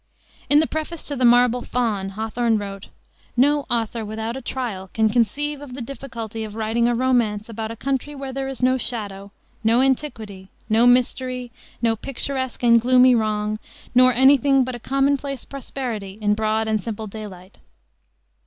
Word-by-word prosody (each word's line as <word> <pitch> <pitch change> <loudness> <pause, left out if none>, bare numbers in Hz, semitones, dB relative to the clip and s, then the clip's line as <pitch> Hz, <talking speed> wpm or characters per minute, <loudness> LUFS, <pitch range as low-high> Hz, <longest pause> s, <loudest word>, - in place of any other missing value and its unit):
In 290 - +6
the 315 - +3
preface 315 +1 -4
to 285 - -2
the 255 -1 +1
Marble 245 0 +5
Faun 215 -7 -1
Hawthorne 225 +1 0
wrote: 195 -1 -6 0.5
"No 285 +3 +3
author 230 -1 -1
without 220 +2 -4
a 265 - -5
trial 230 -8 -4
can 220 -1 +3
conceive 280 +6 0
of 265 -4 -9
the - - -7
difficulty 230 -4 -6
of 215 -1 -7
writing 225 +2 +1
a 240 - +1
romance 230 -4 +1
about 220 -1 -4
a 230 - -6
country 275 +4 -3
where 270 -1 -6
there 270 0 -3
is 270 -1 -6
no 255 +1 +3
shadow, 200 -5 -5 0.3
no 225 +2 +4
antiquity, 225 -8 -1 0.2
no 225 +2 +4
mystery, 250 0 +1 0.3
no 225 -1 +3
picturesque 260 +1 -4
and 235 -1 +6
gloomy 255 +1 +6
wrong, 215 -2 0 0.3
nor 255 +1 +6
any 265 +3 +6
thing 270 +1 +3
but 255 0 -4
a 240 - -6
commonplace 275 +1 0
prosperity 235 -7 -6
in 210 -1 +2
broad 220 +1 0
and 215 -1 0
simple 220 -1 -5
daylight." 200 -3 -10
235 Hz, 170 wpm, -22 LUFS, 220-260 Hz, 0.5 s, In